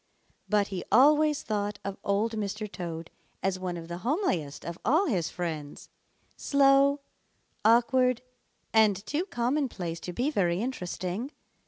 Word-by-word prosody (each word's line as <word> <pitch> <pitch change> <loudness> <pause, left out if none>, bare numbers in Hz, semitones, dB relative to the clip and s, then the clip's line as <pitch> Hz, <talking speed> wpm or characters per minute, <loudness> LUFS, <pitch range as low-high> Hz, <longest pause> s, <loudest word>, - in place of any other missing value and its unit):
But 205 -1 +2
he 185 -3 -4
always 295 +5 +5
thought 205 -1 -2
of 200 -1 -3
Old 205 +3 +1
Mr. 215 0 -3
Toad 170 -4 -6 0.3
as 190 -1 0
one 180 -2 -3
of 165 -1 -8
the 170 +1 -6
homeliest 185 - -1
of 170 +1 -6
all 315 - +3
his 185 - 0
friends, 155 -5 -5 0.5
slow, 280 0 +4 0.6
awkward, 250 +2 +4 0.5
and 215 -3 +4
too 305 - -2
commonplace 240 - -2
to 180 - -6
be 250 - -1
very 175 - +1
interesting. 195 -1 -3
210 Hz, 135 wpm, -28 LUFS, 180-260 Hz, 0.6 s, always